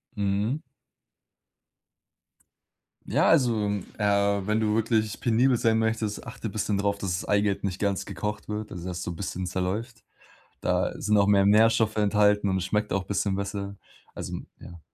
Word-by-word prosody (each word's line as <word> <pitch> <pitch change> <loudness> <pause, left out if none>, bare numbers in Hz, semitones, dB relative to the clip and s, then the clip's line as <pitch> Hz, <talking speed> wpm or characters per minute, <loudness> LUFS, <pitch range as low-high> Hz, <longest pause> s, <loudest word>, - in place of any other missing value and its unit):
Mhm. 105 +7 -1 2.4
Ja, - - +2
also, 115 -6 +3 0.3
äh, 100 -1 +1
wenn 105 +1 +1
du 105 -1 +1
wirklich 110 -1 0
penibel 120 +2 +3
sein 110 -1 +2
möchtest, 110 -1 -1
achte - - -6
bisschen 105 0 -1
drauf, 100 0 0
dass 95 -3 -2
das - - -7
Eigelb 100 -1 +1
nicht 95 0 -3
ganz 100 -2 -1
gekocht 105 0 -4
wird, 105 0 -4
also 90 -2 -6
dass 90 0 -4
so - - -4
'n 85 - -7
bisschen 95 -1 -4
zerläuft. 100 +6 -3 0.6
Da - - +1
sind 105 0 +2
auch 100 - +5
mehr 100 -1 +4
Nährstoffe 110 +1 +4
enthalten 105 0 +3
und 95 -1 +1
es 95 - -2
schmeckt 105 +2 -1
auch 95 -1 -1
bisschen 100 -1 -1
besser. 100 0 -4 0.4
Also - - -5 0.2
ja, 85 -1 -11
105 Hz, 160 wpm, -26 LUFS, 100-110 Hz, 2.4 s, auch